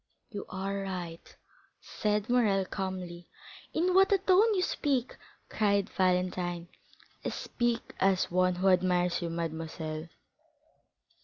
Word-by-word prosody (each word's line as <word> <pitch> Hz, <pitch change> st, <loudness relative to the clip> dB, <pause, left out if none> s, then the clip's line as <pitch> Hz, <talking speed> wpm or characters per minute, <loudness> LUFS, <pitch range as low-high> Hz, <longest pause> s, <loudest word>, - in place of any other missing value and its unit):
"You 205 Hz, -2 st, -6 dB
are 195 Hz, +1 st, -3 dB
right," 180 Hz, -4 st, -6 dB, 0.4 s
said 210 Hz, 0 st, -1 dB
Morrel, 215 Hz, -6 st, +3 dB
calmly. 185 Hz, -3 st, -5 dB, 0.4 s
"In 360 Hz, +3 st, +1 dB
what 385 Hz, +2 st, +5 dB
a 400 Hz, -, +6 dB
tone 390 Hz, +4 st, +4 dB
you 365 Hz, -, +2 dB
speak!" 270 Hz, -8 st, 0 dB, 0.3 s
cried 200 Hz, -2 st, +1 dB
Valentine. 180 Hz, -2 st, 0 dB, 0.5 s
"I -, -, -1 dB
speak 240 Hz, -1 st, -2 dB
as 190 Hz, -2 st, +2 dB
one 185 Hz, 0 st, +3 dB
who 190 Hz, +2 st, +2 dB
admires 180 Hz, -1 st, +2 dB
you, 170 Hz, -, -2 dB
mademoiselle." 160 Hz, -1 st, -4 dB
190 Hz, 120 wpm, -30 LUFS, 175-220 Hz, 0.5 s, a